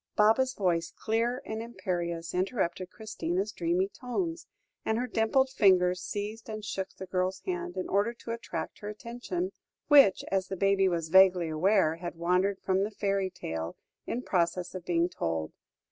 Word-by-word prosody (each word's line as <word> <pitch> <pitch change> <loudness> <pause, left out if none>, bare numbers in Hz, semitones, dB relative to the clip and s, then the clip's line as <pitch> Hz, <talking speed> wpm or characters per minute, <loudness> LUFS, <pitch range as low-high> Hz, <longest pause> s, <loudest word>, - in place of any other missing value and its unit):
Baba's 225 +5 +4
voice, 170 -4 0
clear 230 +3 0
and 220 0 -4
imperious, 175 -7 -3
interrupted 185 -2 -1
Christina's 195 -2 -3
dreamy 175 0 0
tones, 330 - -4 0.4
and 220 - 0
her 245 - 0
dimpled 250 +3 +2
fingers 180 -5 +4
seized 210 +4 -5
and 215 -1 -5
shook 190 -1 -3
the 190 - -7
girl's 185 0 -1
hand, 175 -1 -3
in 185 - -2
order 200 +4 +2
to 230 - -7
attract 230 0 -5
her 205 - -6
attention, 245 - -4 0.4
which, 280 -10 +7
as 190 -1 +1
the 190 - -4
baby 195 0 +3
was 165 -3 -1
vaguely 185 -2 +6
aware, 165 0 +3
had 175 0 -6
wandered 180 +4 +1
from 190 0 +2
the 205 - -1
fairy 195 -2 -1
tale 80 - -5 0.3
in 245 - -2
process 175 0 0
of 185 -2 -7
being 170 0 +2
told. 80 - -3
190 Hz, 160 wpm, -29 LUFS, 175-220 Hz, 0.4 s, which